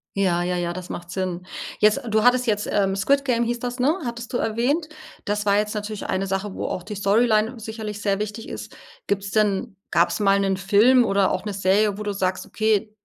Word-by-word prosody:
Ja, 180 -3 +2
ja, 180 0 -1
ja, 175 0 -2
das 185 0 -8
macht 175 0 -7
Sinn. 185 -1 -3 0.3
Jetzt 215 +1 +4
du 215 0 +2
hattest 250 0 +4
jetzt, 210 -1 0
ähm 195 -1 +1
Squid 275 +8 +2
Game 235 -3 +2
hieß 240 0 -2
das, 245 +1 -4
ne, 290 +7 +3
hattest 235 +1 -6
du - - +2
erwähnt. 255 +9 0 0.4
Das 205 0 -1
war 200 0 +4
jetzt 210 +1 -1
natürlich 210 0 -4
eine 190 +1 -1
Sache, 195 +1 -3
wo - - -4
auch 185 - -3
die 210 +1 -7
Storyline 220 +3 +2
sicherlich 215 -2 -6
sehr 200 -2 +1
wichtig 210 +2 -5
ist. - - -8 0.3
Gibt's 200 0 -1
denn 205 -3 +1 0.2
gab's 170 +4 +2
mal 200 -1 +3
'nen 195 -1 +1
Film 220 +6 +5
oder 195 -1 +2
auch 185 - -2
'ne 205 - -3
Serie, 195 +2 +2
wo - - -4
du 205 -1 -2
sagst: 185 -1 -2
„Okay, 215 -1 0
210 Hz, 215 wpm, -23 LUFS, 195-225 Hz, 0.4 s, Film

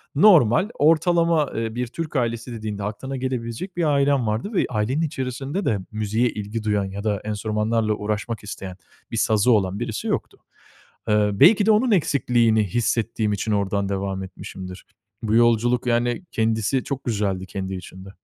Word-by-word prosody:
normal, 170 - +5
ortalama, 165 0 +3
ııı, 115 -2 -4
bir 125 0 -2
Türk 155 +6 -6
ailesi 120 -1 -1
dediğinde 105 -3 -5
aklına 130 +7 -4
gelebilecek 130 - -4
bir 175 - +1
ailem 140 -4 +2
vardı 110 - -2
ve 195 - +2
ailenin 120 +6 0
içerisinde 140 +4 -3
de 105 -3 +1
müziğe 110 +3 0
ilgi 105 +1 -5
duyan 105 -2 +1
ya 100 +1 -6
da 105 -2 0
enstrümanlarla 110 +1 0
uğraşmak 105 +2 -3
isteyen, 95 -2 -7 0.3
bir - - -3
sazı 110 +3 +3
olan 100 -3 +1
birisi 115 -2 -4
yoktu. - - -2 0.7
Iıı, 105 -1 +2
belki 205 +2 +6
de 220 - +5
onun 225 +3 +3
eksikliğini 120 - +2
hissettiğim 110 +1 0
için 105 +2 -2
ordan 100 -1 0
devam 95 -1 -2
etmişimdir. 95 0 -9 0.4
Bu 110 0 +1
yolculuk, 120 +1 +3
yani 120 +6 +1
kendisi 110 +3 0
çok 140 -1 -4
güzeldi 100 -5 -1
kendi 95 0 -4
içinde. 95 +1 -10
115 Hz, 155 wpm, -23 LUFS, 105-130 Hz, 0.7 s, belki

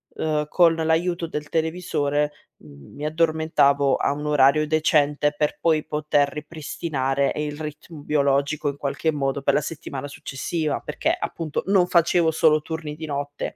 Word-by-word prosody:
uhm, 150 -1 -1
con 170 0 +4
l'aiuto 165 +2 0
del 150 -2 -5
televisore 155 -3 0 0.3
m 70 -2 -15
mi 150 - -5
addormentavo 155 -3 +2
a - - 0
un 150 +1 -6
orario 150 +1 +4
decente, 150 -1 +2
per 150 -1 0
poi 160 -2 +2
poter 150 -1 +1
ripristinare 145 -2 -2
il 150 -1 -3
ritmo 155 +1 -8
biologico 145 +1 +1
in 140 - -5
qualche 145 +3 -1
modo 135 -1 -1
per 140 0 +2
la 150 - +2
settimana 145 -2 -6
successiva, 150 +3 -3
perché, - - -1
appunto, 160 -3 -4
non 190 -3 +4
facevo 170 -1 +3
solo 155 -1 +3
turni 155 -1 -5
di 160 +1 -7
notte 145 0 -4
150 Hz, 150 wpm, -23 LUFS, 145-160 Hz, 0.3 s, con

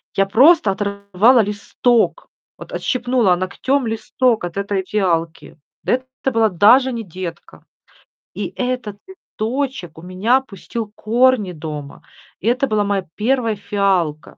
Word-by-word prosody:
Я 195 - +3
просто 250 - +5
оторвала 200 +4 +2
листок, 225 - 0 0.3
вот - - -11
отщипнула 245 -6 +1
ногтем 235 +8 -1
листок 225 +1 0
от 175 +1 -5
этой 200 -1 -1
фиалки. 170 -7 -2 0.3
Это 260 +1 -2
была 225 -2 +3
даже 225 +9 +5
не 230 -2 -4
детка. 175 -2 -9 0.7
И 205 - -4
этот 250 -5 -3
листочек 260 - -5
у - - -10
меня 195 +9 +1
пустил 215 -1 -7
корни 235 -3 +2
дома. 150 -3 -8 0.4
Это 245 +6 +1
была 215 -3 +1
моя 200 -2 -1
1 230 0 0
фиалка. 195 -7 -1
210 Hz, 120 wpm, -19 LUFS, 190-250 Hz, 0.7 s, просто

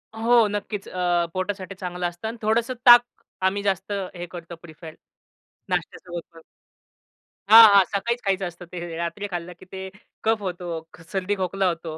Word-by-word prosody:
हो, 230 0 +4
नक्कीच 205 0 -4
अ, 175 -1 +1
पोटासाठी 190 +1 -4
चांगलं 180 -2 -3
असतं 175 +5 -7
आणि 230 +1 -5
थोडंसं 225 +3 +1
ताक 240 -1 +10 0.4
आम्ही 200 +2 0
जास्त 195 0 -1 0.2
हे 175 - -5
करतो 170 -1 -8
प्रीफर 160 -1 -11 0.8
नाश्त्यासोबत 175 -1 -4
पण. 165 - -14 1.1
हां, 225 +1 +11
हां, 200 - +8
सकाळीच 235 +5 -2
खायचं 195 -1 0
असतं 175 +1 -10
ते, 170 -2 -6
रात्री 170 +5 -4
खाल्लं 175 0 -5
की 185 - -14
ते 190 0 -6 0.4
कफ 220 -1 +1
होतो, 175 -1 -5 0.2
क 165 - -15
सर्दी 195 +1 -1
खोकला 190 +1 0
होतो. 165 -1 -8
190 Hz, 160 wpm, -24 LUFS, 175-205 Hz, 1.1 s, हां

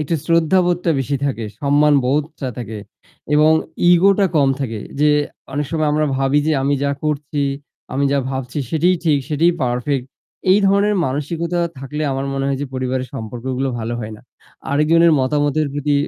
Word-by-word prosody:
একটু 150 +2 -1
শ্রদ্ধাবোধটা 175 +1 +2
বেশি 140 +2 -1
থাকে, 120 -5 -2 0.2
সম্মানবোধটা 145 0 +1
থাকে 110 -3 -6 0.6
এবং 150 +1 +5 0.4
ego 180 +3 +6
টা 200 - +4
কম 140 -2 +4
থাকে, 115 -5 -3 0.2
যে 150 - +5 0.4
অনেক 145 +1 -2
সময় 155 -2 0
আমরা 155 0 +1
ভাবি 135 +2 +2
যে 160 - +2
আমি 140 +1 +2
যা 140 - +1
করছি, 150 -1 -2 0.5
আমি 140 +2 0
যা 140 - +2
ভাবছি 130 0 -4
সেটিই 175 +3 +2
ঠিক 150 -3 +3
সেটিই 165 +3 +3
perfect 125 +2 -1 0.5
এই 190 - +6
ধরনের 200 +2 +3
মানসিকতা 165 +6 -2 0.2
থাকলে 150 +3 -5
আমার 135 +1 -2
মনে 135 0 -2
হয় 135 -1 -1
যে - - -3
পরিবারের 130 0 -2
সম্পর্কগুলো 125 +3 -3
ভালো 115 +1 -3
হয় 110 -1 -6
না - - -17 0.5
আরেকজনের 160 +3 +4
মতামতের 145 +3 +1
প্রতি 145 0 0
145 Hz, 160 wpm, -19 LUFS, 130-155 Hz, 0.6 s, ego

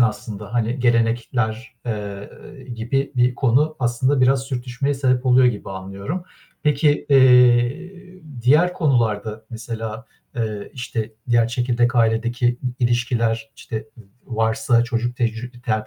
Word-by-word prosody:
aslında, 105 -2 -2
hani 120 +2 0
gelenekler, 115 0 0
eee, 105 -3 -4 0.5
gibi 130 +5 -2
bir 125 0 +3
konu 140 +6 +2
aslında 130 +2 +1
biraz 130 +1 +3
sürtüşmeye 135 +1 -3
sebep 130 -1 0
oluyor 125 0 +5
gibi 110 -6 -2
anlıyorum. 95 - -5 0.4
Peki, 150 0 +2
eee, 135 +8 +3 0.2
diğer 155 +8 +4
konularda, 110 - 0
mesela, 115 0 -6 0.3
eee, 110 -3 -3
işte, 120 -4 -4 0.2
diğer 120 -1 +3
çekirdek 120 0 0
ailedeki 120 +2 +1
i 125 0 -2
ilişkiler, 115 -2 0
işte 135 -5 -6 0.2
v 115 - -13 0.2
varsa 115 0 +1
çocuk 120 0 -2
tec 115 -3 0 0.3
ter 110 -1 -1
120 Hz, 120 wpm, -21 LUFS, 115-130 Hz, 0.5 s, oluyor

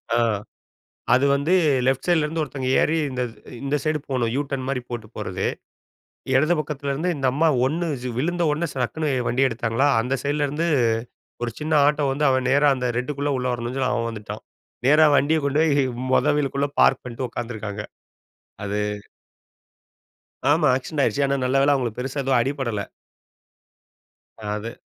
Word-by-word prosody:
ஆ - - +3 1.0
அது 130 +2 +3
வந்து 140 +5 0 0.3
லெஃப்ட் 130 0 +1
சைட்லேருந்து 160 -2 +1
ஒருத்தவங்க 135 -3 -4
ஏறி 160 - +2
இந்த 125 -1 -2 0.4
இந்த 140 +1 0
சைடு 155 0 +1
போணும். 120 -3 0
யூ 145 - +1
டர்ன் 130 -2 -3
மாரி 135 -2 -1
போட்டு 120 -3 -5
போறது 95 -2 -3 0.9
இடது 155 +6 +4
பக்கத்துலேருந்து 150 +2 -2
இந்த 135 -2 0
அம்மா 160 +4 +3 0.2
ஒண்ணு 165 +6 -1 0.3
விழுந்த 175 +5 0
உடனே 160 +3 -1
சடக்குன்னு 145 +4 -2 0.2
வண்டிய 130 +2 +2
எடுத்தாங்களா, 115 +4 0
அந்த 125 +3 -2
சைடிலேருந்து 145 +3 0 0.8
ஒரு 120 - -1
சின்ன 155 +1 -3
ஆட்டோ 150 0 +2
வந்து 150 +2 +1
அவன் 130 -1 +1
நேரா 145 +2 +4
அந்த 125 -1 -2
ரெட்டுக்குள்ள 140 +3 -2
உள்ள 125 - -2
வரணுன்னு 120 +1 -4
சொல்லி 130 -1 +1
அவன் 115 0 -1
வந்துட்டான். 105 -2 -7 0.4
நேரா 155 +3 +6
வண்டிய 155 +4 +3
கொண்டு 140 +2 +1
போய் 145 -3 +3 0.3
மொத - - +4
வீலுக்குள்ள 140 0 0
பார்க் - - +4
பண்ணிட்டு 125 +1 -4
உட்காந்துருக்காங்க. 110 -3 -5 0.8
அது 100 +1 -2 1.7
ஆமா. 150 +1 +4
ஆக்சிடென்ட் 135 +3 -2
ஆயிடுச்சு. 140 - +1
ஆனா 140 - +1
நல்ல 130 +2 +2
வேல 145 +1 +4
அவங்களுக்கு 125 -4 -2
பெருசா 135 +2 -3
எதுவும் 135 -2 +3
அடிபடல. 125 -5 -2 1.6
அ 110 - -13
அது. 115 +2 -8
135 Hz, 150 wpm, -23 LUFS, 125-150 Hz, 1.7 s, நேரா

